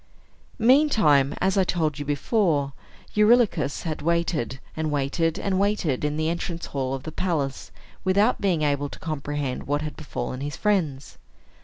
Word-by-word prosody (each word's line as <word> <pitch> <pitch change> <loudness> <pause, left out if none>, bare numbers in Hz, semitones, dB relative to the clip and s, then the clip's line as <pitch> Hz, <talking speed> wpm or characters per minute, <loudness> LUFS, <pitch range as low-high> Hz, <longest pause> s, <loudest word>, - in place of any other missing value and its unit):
Meantime, 220 - +4
as 190 +1 +2
I - - +5
told 155 -5 -1
you 145 - -4
before, 145 - +1 0.4
Eurylochus 210 - +3
had 155 -3 -3
waited, 165 -5 0 0.2
and 160 -1 -1
waited, 150 +3 0
and 190 -2 0
waited, 195 -10 0
in 150 0 -1
the 155 0 0
entrance 170 0 -3
hall 135 -1 -2
of 135 - -8
the 160 - -6
palace, 150 -7 -2 0.3
without 200 +5 +2
being 180 -6 +1
able 145 -1 0
to - - -10
comprehend 145 -3 -4
what 145 +1 0
had 155 - -5
befallen 130 -3 -5
his 145 +1 -4
friends. 160 -10 -1
155 Hz, 155 wpm, -25 LUFS, 140-190 Hz, 0.4 s, I